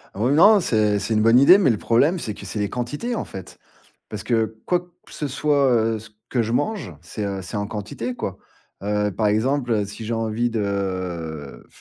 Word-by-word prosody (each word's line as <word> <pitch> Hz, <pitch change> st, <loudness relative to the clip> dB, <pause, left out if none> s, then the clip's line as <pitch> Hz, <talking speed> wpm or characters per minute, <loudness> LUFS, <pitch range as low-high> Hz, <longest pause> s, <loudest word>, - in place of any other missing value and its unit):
Oui 120 Hz, +7 st, +1 dB
non, 205 Hz, +7 st, +7 dB
c'est 105 Hz, -, +2 dB
c'est 110 Hz, +3 st, -2 dB
une 110 Hz, -, +2 dB
bonne 115 Hz, +3 st, +6 dB
idée, 180 Hz, +8 st, +8 dB
mais 180 Hz, -10 st, +3 dB
le 110 Hz, -, +2 dB
problème, 145 Hz, -, +2 dB
c'est 105 Hz, -, -4 dB
que -, -, -11 dB
c'est 105 Hz, -, -4 dB
les 100 Hz, -, -1 dB
quantités 145 Hz, -, -3 dB
en -, -, -2 dB
fait. 95 Hz, -2 st, -10 dB, 0.5 s
Parce 105 Hz, -2 st, -6 dB
que 110 Hz, -2 st, 0 dB
quoi 180 Hz, -, +3 dB
que 175 Hz, 0 st, -21 dB
ce 150 Hz, -, -3 dB
soit, 140 Hz, -1 st, +2 dB
heu, 115 Hz, -1 st, +2 dB
ce 110 Hz, +1 st, -13 dB, 0.2 s
que 120 Hz, -3 st, +1 dB
je 115 Hz, +1 st, -3 dB
mange, 145 Hz, -, -1 dB
c'est, 90 Hz, +5 st, -6 dB
heu, 100 Hz, -1 st, -3 dB
c'est 95 Hz, +4 st, -6 dB
en 105 Hz, 0 st, -1 dB
quantité 110 Hz, +4 st, -5 dB
quoi. 95 Hz, -5 st, -5 dB, 0.5 s
Heu, 105 Hz, 0 st, 0 dB
par 105 Hz, +2 st, -1 dB
exemple, 120 Hz, +4 st, +1 dB
heu, 105 Hz, -2 st, +1 dB
si 105 Hz, +3 st, -8 dB
j'ai 115 Hz, -, -1 dB
envie 115 Hz, +1 st, 0 dB
de, 95 Hz, -, -4 dB
110 Hz, 215 wpm, -22 LUFS, 105-130 Hz, 0.5 s, idée